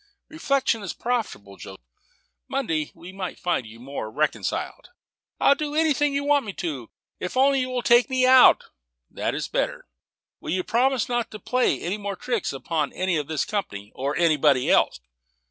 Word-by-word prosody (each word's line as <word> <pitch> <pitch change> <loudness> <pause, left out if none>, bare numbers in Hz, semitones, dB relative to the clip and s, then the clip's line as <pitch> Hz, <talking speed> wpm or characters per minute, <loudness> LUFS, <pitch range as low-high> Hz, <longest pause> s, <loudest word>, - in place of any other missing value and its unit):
"Reflection 275 -7 0
is 195 -5 -5
profitable, 220 - -3
Joseph. 95 -9 -11 0.6
Monday 165 - -2
we 170 +2 -11
might 190 -1 -6
find 175 -10 -1
you 115 +1 -13
more 130 -3 -6
reconciled." 150 +7 -2 0.5
"I'll - - +5
do 295 +1 -4
anything 295 -2 +2
you 280 - 0
want 290 -1 +3
me 205 -3 -6
to, 145 -12 -5 0.3
if 180 - -5
you 260 - +4
will - - +6
only 255 -2 0
take 240 0 +5
me 260 -1 +2
out." 260 0 +7 0.5
"That - - -2
is - - -3
better. - - -2 0.5
Will - - -8
you 185 0 0
promise 255 +3 +1
not 240 -2 -1
to 215 - -9
play 250 +5 +1
any 190 +5 -3
more 200 -1 -4
tricks 240 0 -2
upon 150 +2 -2
any 185 -1 -1
of 150 -2 -3
this 155 -2 -1
company, 105 - -4
or 140 +3 -3
anybody 150 -6 +3
else?" - - +2
200 Hz, 175 wpm, -24 LUFS, 150-255 Hz, 0.6 s, out